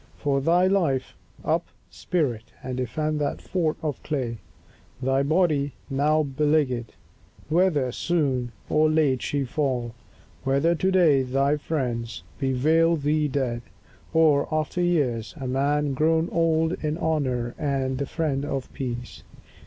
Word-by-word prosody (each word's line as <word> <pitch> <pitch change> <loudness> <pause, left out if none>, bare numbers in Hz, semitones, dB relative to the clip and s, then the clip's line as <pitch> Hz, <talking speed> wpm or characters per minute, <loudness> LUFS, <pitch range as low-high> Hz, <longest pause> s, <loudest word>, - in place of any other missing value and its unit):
For 140 -1 0
thy 175 +5 +4
life, 165 -9 +1 0.3
Up, - - +1 0.2
spirit, 125 -10 -2
and 130 0 -4
defend 150 +5 -1
that 145 - -1
fort 165 -4 -1
of 150 -4 -3
clay, 125 -7 -3 0.6
Thy 135 +1 +1
body, 145 -2 +2 0.2
now 150 +3 +2
beleaguered; 140 -4 0 0.6
whether 155 -6 +2
soon 135 -6 0 0.2
Or 155 0 +3
late 150 -5 +2
she 145 -1 -1
fall; 125 -4 -1 0.5
whether 140 +5 +2
to 185 +3 +1
day 165 -7 +5
thy 135 +3 +1
friends 120 - -3 0.2
Bewail 155 +6 +3
thee 150 0 +1
dead, 130 -4 -1 0.5
or, 155 -3 +4
after 155 +3 -1
years, 125 - 0
a 135 - -5
man 140 +2 +1
Grown 160 +4 +2
old 165 0 +1
in 155 +1 -1
honour 130 -8 -1
and 135 -3 -1
the 140 - -2
friend 145 -4 -1
of 135 -2 -4
peace. 120 -2 -5
145 Hz, 130 wpm, -25 LUFS, 130-160 Hz, 0.6 s, day